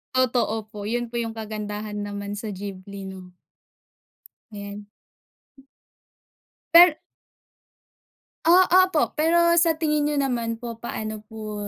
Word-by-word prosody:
Totoo 245 -3 +1
po. 210 -2 -7
'Yon 240 +1 -2
po 235 - -2
'yong 225 -1 -4
kagandahan 210 -1 -5
naman 205 0 -5
sa 220 - -6
Ghibli. 195 0 -8 1.5
Ayan. 205 0 -8 1.9
Per 340 -2 +8 1.5
Ah, 360 +3 +6
ah, 370 +1 +6
opo. 330 -5 0
Pero 325 +3 +3 0.2
sa 330 -1 +5
tingin 300 -2 +1
niyo 295 0 0
naman 235 -4 -2
po, 235 -2 -6
paano 215 -2 -5
po 215 -1 -6
225 Hz, 115 wpm, -24 LUFS, 210-295 Hz, 1.9 s, Per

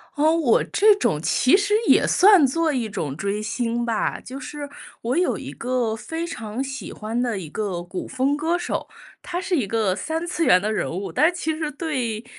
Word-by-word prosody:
哦， 310 +2 +3
我 295 -9 +3
这 420 0 +4
种 155 - 0
其 255 - +3
实 410 +1 +1
也 - - +5
算 385 -5 +6
作 315 +3 +1
一 235 -4 -2
种 150 -8 -4
追 200 +5 -2
星 235 +2 -2
吧。 230 -2 -1
就 265 +2 -8
是 290 +1 -7 0.3
我 245 +6 -1
有 360 - +1
一 - - -7
个 245 -2 -1
非 325 +9 -5
常 230 -7 -5
喜 265 -2 -6
欢 220 +2 -4
的 235 -5 -1
一 170 - -7
个 185 -1 -3
古 180 +1 -6
风 265 +2 0
歌 325 +4 0
手， 350 - -3 0.3
他 355 -1 -4
是 370 0 -1
一 255 -10 0
个 210 -3 +1
三 320 - -3
次 345 -1 -1
元 180 - +6
的 210 +2 -1
人 - - -1
物。 190 +4 -4
但 320 +4 +3
其 320 -3 -2
实 310 -1 -3
对 260 -8 -3
255 Hz, 220 characters per minute, -23 LUFS, 215-325 Hz, 0.3 s, 算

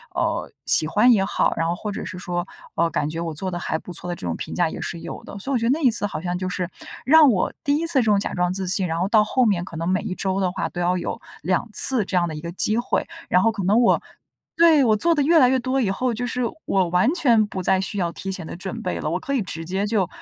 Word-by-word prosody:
呃， - - -1
喜 155 - +4
欢 215 +8 +4
也 195 -4 +3
好， - - +1
然 165 - 0
后 170 - -1
或 210 +4 -5
者 - - -5
是 185 - -7
说 175 0 -3 0.3
“哦， 170 +1 +2
感 150 -2 -1
觉 165 +1 -5
我 165 -2 -4
做 185 +5 -4
得 175 - -4
还 160 - -2
不 180 - -10
错” 175 +1 -9
的 175 - -2
这 90 - -7
种 85 - -2
评 - - -6
价 175 -2 +1
也 - - -7
是 170 - -5
有 165 - -8
的。 200 - -9
所 270 +8 -5
以 - - +1
我 - - +3
觉 230 - -2
得 240 - +3
那 315 - 0
一 265 - +5
次 220 -3 -1
好 200 - -4
像 180 0 -2
就 185 0 -3
是 180 -1 -3 0.4
让 300 0 +7
我 190 -4 0
第 285 -3 +1
1 315 - -1
次 - - -2
这 275 -7 +2
种 210 -2 +3
假 - - -4
装 180 0 0
自 190 0 -4
信， 190 0 0
然 165 +1 -2
后 185 - +1
到 215 -2 +5
后 250 +3 +1
面 180 -5 +1
可 170 - -9
能 165 +2 -2
每 185 - +1
一 - - -4
周 190 +1 -2
的 185 -2 0
话 - - -3
都 175 - -7
要 175 +1 +1
有 175 - -4 0.2
2 185 +7 0
次 250 -6 +7
这 185 - -4
样 175 -1 +2
的 155 - -5
一 150 - -7
个 170 - -6
机 215 +5 0
会， 240 - -1 0.2
然 180 - +4
后 225 - +3
可 205 -3 -5
能 210 +6 +3
我 235 - +4 0.6
对， 325 -4 +6
我 220 -3 +3
做 335 +10 +2
得 290 - +2
越 325 +3 +5
来 250 -3 +6
越 260 - +2
多 260 +2 -1
以 215 - 0
后， 245 +5 -1
就 245 +2 -3
是 250 +1 -3 0.2
我 190 -3 +1
完 180 - +3
全 235 -11 +3
不 190 -3 -5
再 190 +1 +2
需 200 +1 -3
要 170 -2 -1
提 190 +3 -6
前 185 -4 -5
的 - - -7
准 180 - -6
备 - - -3
了， - - -2
我 - - -1
可 275 - -4
以 260 - +1
直 165 -4 -5
接 190 +4 -2
就 205 -5 +1
195 Hz, 325 characters per minute, -22 LUFS, 175-240 Hz, 0.6 s, 让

